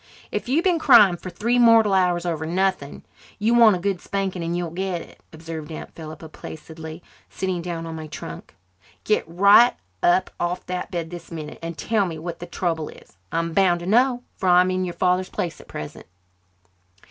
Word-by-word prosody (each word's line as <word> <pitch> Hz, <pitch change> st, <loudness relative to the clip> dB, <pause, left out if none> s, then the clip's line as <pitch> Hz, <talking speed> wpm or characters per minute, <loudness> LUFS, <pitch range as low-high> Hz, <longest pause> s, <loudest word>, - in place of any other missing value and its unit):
"If -, -, -3 dB
you've 305 Hz, +6 st, +2 dB
been 355 Hz, -3 st, +2 dB
crying 210 Hz, -, +7 dB
for 185 Hz, -, -8 dB
three 230 Hz, +7 st, 0 dB
mortal 225 Hz, -3 st, +6 dB
hours 180 Hz, -2 st, +2 dB
over 160 Hz, -2 st, -2 dB
nothing 185 Hz, -4 st, -1 dB, 0.3 s
you 220 Hz, +3 st, +1 dB
want 230 Hz, -4 st, +7 dB
a -, -, -4 dB
good 190 Hz, -1 st, -1 dB
spanking 190 Hz, -3 st, -3 dB
and 170 Hz, +1 st, -2 dB
you'll 175 Hz, -2 st, -3 dB
get 180 Hz, -1 st, -3 dB
it," -, -, -18 dB
observed 160 Hz, -1 st, -8 dB
Aunt 155 Hz, -, -8 dB
Philippa 160 Hz, 0 st, -9 dB
placidly, 160 Hz, +1 st, -10 dB, 0.3 s
sitting 185 Hz, -2 st, -3 dB
down 170 Hz, -1 st, -5 dB
on 165 Hz, -1 st, -6 dB
my 155 Hz, -1 st, -7 dB
trunk. 150 Hz, -, -9 dB, 0.5 s
"Get 215 Hz, -, +1 dB
right 200 Hz, +8 st, +6 dB, 0.3 s
up 180 Hz, +2 st, +3 dB
off 175 Hz, +1 st, -2 dB
that 180 Hz, 0 st, -4 dB
bed 170 Hz, -2 st, -4 dB
this 175 Hz, -1 st, -9 dB
minute 155 Hz, -2 st, -7 dB
and 165 Hz, -1 st, -6 dB
tell 205 Hz, +4 st, +1 dB
me 165 Hz, -2 st, -5 dB
what 170 Hz, +2 st, -6 dB
the 175 Hz, -, -7 dB
trouble 165 Hz, -3 st, -2 dB
is. -, -, -16 dB, 0.2 s
I'm 165 Hz, 0 st, -1 dB
bound 175 Hz, -2 st, +3 dB
to -, -, -6 dB
know, 245 Hz, +5 st, +3 dB
for 185 Hz, -, 0 dB
I'm 180 Hz, +1 st, +5 dB
in 185 Hz, 0 st, -1 dB
your 175 Hz, -, -5 dB
father's 185 Hz, +1 st, +1 dB
place 170 Hz, -2 st, -4 dB
at -, -, -19 dB
present." -, -, -8 dB
175 Hz, 195 wpm, -23 LUFS, 165-195 Hz, 0.5 s, crying